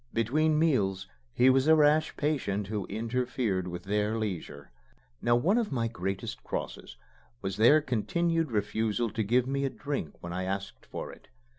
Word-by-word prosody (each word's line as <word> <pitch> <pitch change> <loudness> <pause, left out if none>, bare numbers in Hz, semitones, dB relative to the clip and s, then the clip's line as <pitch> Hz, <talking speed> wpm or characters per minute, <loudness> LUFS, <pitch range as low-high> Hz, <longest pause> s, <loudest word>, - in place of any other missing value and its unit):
Between 150 +8 +2
meals 100 - +1 0.3
he 125 - +3
was 135 +2 +2
a 160 - +7
rash 155 +1 +3
patient 125 -10 -1
who 105 -1 -4
interfered 115 -3 -1
with 90 0 -6
their 105 +3 0
leisure. 90 -9 -5 0.5
Now 120 0 +3
one 185 - +3
of 225 -7 -2
my 115 -4 0
greatest 95 -3 -4
crosses - - -5 0.5
was 95 0 -3
their 135 +8 +6
continued 165 +6 0
refusal 110 +1 0
to 110 - -2
give 120 +4 +2
me 140 +1 -1
a 135 - +1
drink 140 - -4
when 85 0 -6
I 95 +1 -2
asked 95 +1 -5
for - - -6
it. - - -16
115 Hz, 165 wpm, -29 LUFS, 100-140 Hz, 0.5 s, a